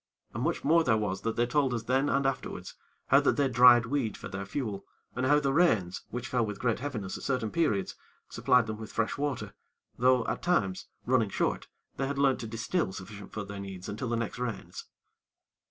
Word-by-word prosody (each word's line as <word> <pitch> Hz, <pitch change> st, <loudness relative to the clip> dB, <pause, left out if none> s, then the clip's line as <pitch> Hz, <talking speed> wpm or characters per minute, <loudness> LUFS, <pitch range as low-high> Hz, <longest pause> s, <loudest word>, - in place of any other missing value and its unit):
And -, -, -4 dB
much -, -, -1 dB
more 165 Hz, +3 st, +4 dB
there 115 Hz, -7 st, +3 dB
was 100 Hz, -3 st, -2 dB
that 115 Hz, -1 st, -2 dB
they 120 Hz, -, +2 dB
told 130 Hz, 0 st, +1 dB
us 115 Hz, -, -3 dB
then 130 Hz, +4 st, +1 dB
and 140 Hz, 0 st, +1 dB
afterwards, 135 Hz, -1 st, -3 dB, 0.4 s
how -, -, +7 dB
that -, -, +2 dB
they 140 Hz, -1 st, +3 dB
dried 120 Hz, -1 st, +7 dB
weed 125 Hz, -3 st, -1 dB
for -, -, -8 dB
their 95 Hz, +1 st, -5 dB
fuel, 110 Hz, -8 st, -3 dB, 0.3 s
and 130 Hz, +1 st, 0 dB
how 145 Hz, +2 st, +5 dB
the 140 Hz, -2 st, 0 dB
rains, 110 Hz, -, +2 dB
which 125 Hz, +2 st, -5 dB
fell 125 Hz, -3 st, +1 dB
with 105 Hz, -2 st, -4 dB
great 120 Hz, -1 st, 0 dB
heaviness 115 Hz, -8 st, -4 dB
at -, -, -11 dB
certain 125 Hz, -5 st, -1 dB
periods, 115 Hz, -, 0 dB, 0.3 s
supplied 125 Hz, -2 st, +3 dB
them 110 Hz, -1 st, -5 dB
with 110 Hz, -1 st, -8 dB
fresh 115 Hz, -1 st, -1 dB
water; 130 Hz, -8 st, -3 dB, 0.5 s
though, 125 Hz, -1 st, +4 dB
at -, -, -2 dB
times, 105 Hz, -, 0 dB, 0.2 s
running 120 Hz, -4 st, +2 dB
short, -, -, -1 dB, 0.3 s
they 135 Hz, -, -1 dB
had 140 Hz, 0 st, -3 dB
learnt 140 Hz, -2 st, +3 dB
to 115 Hz, -, -5 dB
distil 115 Hz, -, -1 dB
sufficient 100 Hz, +1 st, -9 dB
for 110 Hz, -, -4 dB
their 100 Hz, 0 st, -7 dB
needs 95 Hz, -2 st, -7 dB
until 115 Hz, +4 st, -4 dB
the 120 Hz, -, 0 dB
next 115 Hz, +1 st, -3 dB
rains. 125 Hz, -3 st, -5 dB
120 Hz, 210 wpm, -29 LUFS, 105-135 Hz, 0.5 s, how